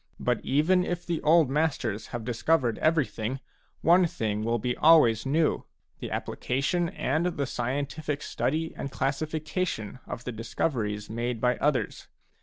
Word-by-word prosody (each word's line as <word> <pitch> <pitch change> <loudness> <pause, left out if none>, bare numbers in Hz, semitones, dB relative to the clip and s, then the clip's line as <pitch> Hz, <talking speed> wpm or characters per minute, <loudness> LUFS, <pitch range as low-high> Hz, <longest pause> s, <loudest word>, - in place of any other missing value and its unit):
But - - 0
even 165 +7 +3
if 175 -1 -3
the 170 -2 -2
old 160 -1 +5
masters 135 -8 -1
have 120 -2 -6
discovered 120 0 +1
everything, 135 -6 0 0.4
one 175 +2 +5
thing 110 -7 -2
will 115 +1 +1
be 125 +2 -1
always 135 -8 +5
new, 155 +3 +1 0.2
— - - -44
the - - -5
application 155 +7 -1
and 160 -1 0
the 140 - 0
scientific 140 +4 -3
study 160 +4 -1
and 140 - -4
classification 150 - -2
of 120 - -6
the 125 - -4
discoveries 110 -2 -2
made 120 +1 -3
by 125 +1 +2
others. 145 -3 -1
140 Hz, 145 wpm, -27 LUFS, 120-160 Hz, 0.4 s, old